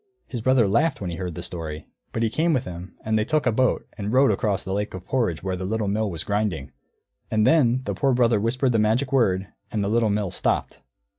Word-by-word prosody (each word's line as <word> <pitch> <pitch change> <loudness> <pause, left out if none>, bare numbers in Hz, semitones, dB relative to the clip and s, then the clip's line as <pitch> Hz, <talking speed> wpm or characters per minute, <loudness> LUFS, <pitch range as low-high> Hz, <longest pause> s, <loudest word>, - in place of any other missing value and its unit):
His 120 - -5
brother 130 -2 +4
laughed 140 +10 +2
when 90 -3 -4
he 85 - -5
heard 90 -3 -4
the 85 - -6
story, 80 -4 -5 0.3
but 115 - -1
he 110 - +1
came 165 +6 +2
with 130 - 0
him, 90 +1 -8
and 110 0 +2
they - - +2
took 155 +5 0
a 120 - +3
boat 130 +3 +1
and 100 +1 -2
rowed 130 +2 +5
across 105 -4 0
the 95 - -4
lake 105 0 -2
of 90 -1 -8
porridge 115 -11 0
to - - -13
where 95 -1 -1
the 95 - -5
Little 105 +2 -1
Mill 105 +1 0
was 85 -3 -4
grinding. 100 -9 -2 0.6
And 110 -1 +2
then 130 -5 +4
the - - -2
Poor 135 -2 +1
Brother 120 -3 +3
whispered 125 +4 +1
the 115 - +2
magic 115 +6 +1
word, 95 -7 +2 0.2
and 105 -2 -1
the 100 - -1
Little 115 0 +2
Mill 100 -3 -1
stopped. - - -1
110 Hz, 245 wpm, -24 LUFS, 95-125 Hz, 0.6 s, rowed